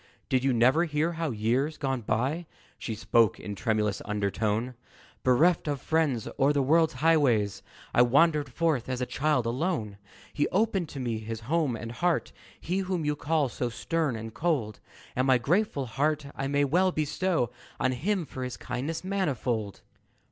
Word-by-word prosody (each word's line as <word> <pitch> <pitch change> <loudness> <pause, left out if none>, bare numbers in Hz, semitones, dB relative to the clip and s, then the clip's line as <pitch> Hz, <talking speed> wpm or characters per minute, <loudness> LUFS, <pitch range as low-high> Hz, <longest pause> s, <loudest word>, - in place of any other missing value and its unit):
"Did 130 -1 +2
you 135 - +3
never 130 +8 +4
hear 155 +1 0
how, 165 -1 -2
years 125 +7 0
gone 135 -3 -1
by," 130 +10 -1 0.3
She 110 - -4
spoke 115 0 +2
in 105 - -6
a - - -4
tremulous 105 -1 0
undertone 105 +3 -1 0.5
"Bereft 155 +7 +3
of 145 -2 -1
friends, 150 -8 0
o'er 140 +1 +4
the 145 -2 +1
world's 160 +4 +3
highways, 125 - +3 0.3
I - - +5
wandered 145 +4 +3
forth 155 -8 0
as 130 -1 -2
a 125 - 0
child 140 -2 0
alone? 115 - -2 0.3
"He 145 - +1
opened 195 -4 0
to 140 - -7
me 120 -4 -2
his 110 +1 -6
home 145 +1 0
and 115 +1 -6
heart 170 +8 0 0.3
He 180 +4 -2
whom 185 -4 -2
you 150 0 +1
call 150 -1 +1
so 125 0 -3
stern 155 +2 -1
and 110 0 -7
cold 140 -11 -1 0.4
And 130 +2 +1
my 130 -1 +6
grateful 150 - 0
heart 145 +5 0
I 135 - -2
may 145 +1 +2
well 180 +6 +3
bestow 155 -4 0 0.3
On 130 - +2
him 180 +8 -1
for 130 -1 -6
his 125 -1 -5
kindness 160 +6 -4
manifold." 130 - -2
135 Hz, 170 wpm, -28 LUFS, 120-160 Hz, 0.5 s, my